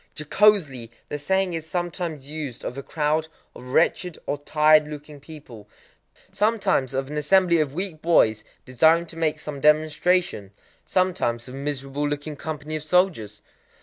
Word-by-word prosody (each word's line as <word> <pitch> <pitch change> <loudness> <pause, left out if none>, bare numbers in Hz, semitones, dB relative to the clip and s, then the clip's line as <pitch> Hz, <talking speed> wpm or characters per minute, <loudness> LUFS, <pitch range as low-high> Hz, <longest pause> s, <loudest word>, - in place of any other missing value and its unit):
Jocosely 150 - +2 0.2
the 145 - -4
saying 190 +4 0
is 160 -1 -5
sometimes 175 -4 -4
used 145 -4 -6
of 125 - -4
a 140 - -5
crowd 155 +2 -1 0.3
of - - -12
wretched 165 +6 +1
or 145 - -2
tired 155 +1 +4
looking 150 -1 -9
people,—sometimes 150 - -4
of 135 +1 -3
an 150 - -4
assembly 175 +2 +3
of 145 -2 -1
weak 180 -4 -5
boys 110 -10 +3 0.2
desiring 160 +7 +3
to 165 - -12
make 160 -2 0
some 145 -2 -6
demonstration,—sometimes 155 - 0
of 125 - -10
a - - -7
miserable 140 0 -3
looking 145 +1 -4
company 155 +1 -5
of 155 - -3
soldiers. 155 - 0
150 Hz, 145 wpm, -24 LUFS, 140-170 Hz, 0.3 s, tired